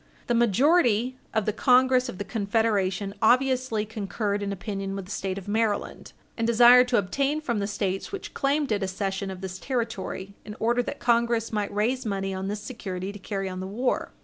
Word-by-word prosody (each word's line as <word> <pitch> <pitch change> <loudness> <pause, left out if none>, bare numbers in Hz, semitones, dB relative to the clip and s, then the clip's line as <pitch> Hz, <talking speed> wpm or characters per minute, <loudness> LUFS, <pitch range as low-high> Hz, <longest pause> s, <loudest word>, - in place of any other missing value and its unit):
The 240 - 0
majority 245 - +3
of 220 -3 0
the 215 - 0
Congress 255 +2 +4
of 185 - -7
the 205 - -3
Confederation 200 -2 0
obviously 255 -2 +2
concurred 205 -1 -3
in 200 0 -2
opinion 195 0 -4
with 195 -1 -5
the 190 - -11
State 195 -2 -3
of 195 - -8
Maryland, 215 0 -1 0.2
and 230 -1 -1
desired 245 +2 +7
to 245 -1 +2
obtain 275 +10 0
from 240 -8 -2
the 200 - -1
States 195 -2 -2
which 395 -1 -6
claimed 280 -1 0
it 210 -1 +1
a 190 - 0
cession 195 +1 -3
of 190 -1 -7
this 190 0 -6
territory, 225 -6 -3
in 210 - -8
order 240 +2 +2
that - - -5
Congress 235 -1 +1
might 210 -2 -1
raise 235 +6 0
money 195 -3 -2
on 190 0 -4
this 205 +1 -3
security 195 -5 -5
to 205 - -10
carry 195 0 -3
on 185 0 -5
the 185 - -4
war. 240 +6 -1
215 Hz, 200 wpm, -26 LUFS, 195-245 Hz, 0.2 s, desired